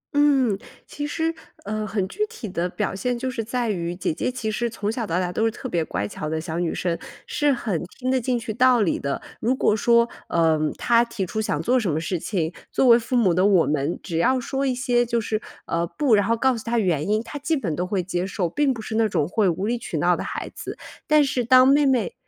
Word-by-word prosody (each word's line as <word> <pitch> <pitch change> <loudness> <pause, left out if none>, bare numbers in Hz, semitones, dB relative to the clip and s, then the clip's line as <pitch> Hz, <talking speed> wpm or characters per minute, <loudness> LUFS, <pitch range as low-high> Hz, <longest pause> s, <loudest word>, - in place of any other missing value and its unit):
嗯， 270 -8 +3 0.3
其 290 0 -5
实， 325 +2 -1 0.3
呃， 215 +1 -2
很 195 -2 -1
具 385 - -14
体 450 - -7
的 180 -2 -2
表 205 +2 -2
现 245 +6 -1
就 255 +1 -3
是 230 -3 -3
在 240 +1 -2
于 175 -2 -3
姐 175 - -1
姐 250 - -2
其 225 -3 -3
实 235 +2 -1
从 215 -2 -3
小 225 -1 -3
到 170 0 0
大 180 -1 -1
都 220 - 0
是 225 - +3
特 250 +3 -7
别 170 -9 0
乖 105 -8 -3
巧 150 +8 -5
的 160 0 -1
小 160 +1 -4
女 170 -2 -1
生， 170 -2 -1 0.3
是 295 -1 +1
很 220 - -1 0.2
听 255 0 -1
得 260 -1 +2
进 245 0 0
去 225 -2 -4
道 250 -1 +4
理 185 - +1
的。 140 0 -3 0.2
如 250 +4 +1
果 215 - +2
说， 235 +1 +4 0.2
呃， 165 -2 +3 0.2
她 235 0 +4
提 235 -5 -3
出 220 +5 -3
想 215 - -1
做 255 +2 +3
什 215 -6 -1
么 155 - 0
事 175 +1 -2
情， 170 -3 -2 0.2
作 265 - +2
为 235 0 +8
父 240 +2 -3
母 200 -8 +4
的 180 +2 +2
我 190 -5 +4
们 150 +2 -1
只 165 -4 -3
要 255 +10 +3
说 275 +1 -2
一 255 - 0
些 245 -1 +2
就 235 0 0
是， 215 -1 -2 0.2
呃， 170 0 -1
不， 280 - +1
然 205 -2 +4
后 230 0 +2
告 260 +1 +2
诉 225 - -6
她 235 +1 -1
原 175 -8 +1
因， 215 +2 +1
她 290 - -7
基 315 +3 0
本 175 - -2
都 180 +2 -2
会 190 -2 -1
接 180 +1 -2
受， 185 -2 -1
并 275 - +1
不 230 -3 -4
是 220 - -5
那 225 0 +3
种 150 -5 0
会 195 0 +2
无 185 +4 -2
理 240 +2 -1
取 - - -4
闹 - - +3
的 - - -4
孩 - - -5
子。 - - -7 0.3
但 305 -1 +5
是 265 -3 0
当 255 +2 +6
妹 285 +1 +5
妹 240 -9 +1
220 Hz, 275 characters per minute, -23 LUFS, 180-250 Hz, 0.3 s, 为